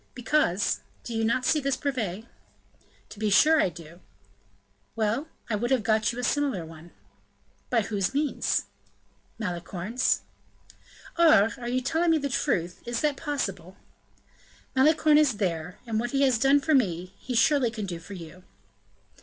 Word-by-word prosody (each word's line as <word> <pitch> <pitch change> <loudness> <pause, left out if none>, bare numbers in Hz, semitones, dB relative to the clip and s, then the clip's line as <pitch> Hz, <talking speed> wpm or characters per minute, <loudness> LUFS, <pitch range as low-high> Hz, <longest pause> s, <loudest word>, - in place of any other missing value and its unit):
"Because 245 -6 +1 0.2
do 235 - -6
you 225 - 0
not 235 +3 +1
see 305 - +3
this 275 -1 -1
brevet?" 225 -8 -3 0.9
"To 205 - -12
be 215 -1 0
sure 310 +10 +5
I - - +2
do." 170 0 -13 1.0
"Well, 225 +7 -1 0.2
I 230 - -3
would 230 +3 -1
have 260 -5 +2
got 220 -1 +2
you 235 - -9
a 250 - -4
similar 265 - 0
one." 160 +1 -13 0.8
"By 235 -2 +2
whose 195 -2 -1
means?" 290 +1 0 0.7
"Malicorne's." 190 +4 -1 1.0
"Aure, 225 -11 +6
are 240 - -6
you 255 +1 0
telling 325 +4 +2
the 280 -1 -2
truth? 180 - -1
Is 240 0 -3
that 295 -2 +1
possible?" 195 - -4 1.0
"Malicorne 305 +2 +5
is 295 -5 +3
there; 180 -2 -2
and 225 -2 -1
what 240 +1 -2
he 275 0 +2
has 255 -4 +3
done 275 +3 +4
for 310 +2 +1
me, 185 - +1
he 255 - -5
surely 260 +1 +3
can 220 -2 -5
do 175 -3 -5
for 200 +4 -11
you." 175 +1 -11
230 Hz, 155 wpm, -26 LUFS, 190-275 Hz, 1.0 s, Aure